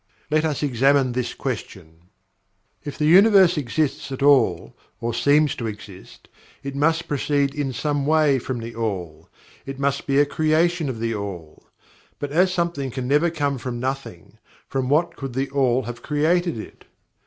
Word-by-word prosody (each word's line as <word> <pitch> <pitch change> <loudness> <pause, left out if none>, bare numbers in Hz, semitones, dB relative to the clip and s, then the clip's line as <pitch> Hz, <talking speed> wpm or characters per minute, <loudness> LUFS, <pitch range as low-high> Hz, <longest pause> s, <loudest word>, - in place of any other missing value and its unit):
Let 155 0 +2
us 155 -1 -2
examine 135 0 +2
this 125 0 -3
question. 90 - -7 0.7
If 145 - -7
the 150 - 0
Universe 190 +1 +6
exists 145 0 -2
at 135 +1 -4
all, 90 - +3 0.2
or 115 0 -3
seems 145 +4 +3
to 115 - -3
exist, 105 -3 -11 0.4
it 140 0 -5
must 165 +3 +1
proceed 145 -1 0
in 145 -3 -2
some 145 +3 -2
way 150 -3 +3
from 125 +1 -4
THE 115 +1 -7
ALL 90 -7 -5 0.3
it 135 0 -7
must 140 0 -1
be 135 -1 +1
a 145 - +5
creation 155 +1 +1
of 120 -4 -5
THE 115 0 -1
ALL. 95 -7 -7 0.5
But 145 -1 -5
as 180 +4 +3
something 170 -6 -2
can 125 0 -5
never 150 +5 +3
come 145 -5 -2
from 120 0 -5
nothing, 130 -9 -6 0.3
from 130 -1 -2
what 155 +5 +1
could 135 -3 -6
THE 135 +2 -2
ALL 130 -2 +1
have 120 +1 -7
created 165 +3 0
it. 110 - -10
140 Hz, 165 wpm, -22 LUFS, 120-150 Hz, 0.7 s, Universe